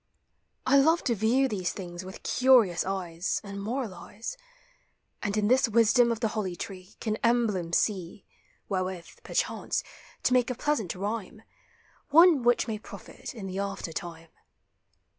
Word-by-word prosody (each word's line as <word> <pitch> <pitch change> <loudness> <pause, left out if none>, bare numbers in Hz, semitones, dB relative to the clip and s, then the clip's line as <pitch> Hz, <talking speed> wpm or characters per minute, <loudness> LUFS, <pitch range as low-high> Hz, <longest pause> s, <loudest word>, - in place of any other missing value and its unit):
I 275 +2 +5
love 320 +5 +4
to 245 - +1
view 230 +6 +2
these 185 -7 -2
things 175 -2 -7
with 190 +1 -10
curious 245 -9 +4
eyes, 180 -2 -2
And 200 -1 -7
moralize; 225 - -5 0.9
And 205 0 -1
in 210 -1 +2
this 255 +1 +4
wisdom 235 +2 +4
of 230 -1 -3
the 225 - +1
holly 200 -5 -3
tree 185 +1 -8
Can 215 -1 -2
emblems 215 -9 +1
see 190 -2 -2 0.4
Wherewith, 185 -2 -4
perchance, - - -1 0.4
to - - +2
make 250 -1 +3
a 250 - -2
pleasant 240 - -1
rhyme, 210 +2 -4 0.7
One 330 -1 +7
which 240 +1 +3
may 215 -2 -3
profit 235 - -10
in 210 -4 -7
the 190 0 -4
after 195 -4 -4
time. 165 -1 -7
210 Hz, 145 wpm, -28 LUFS, 185-240 Hz, 0.9 s, One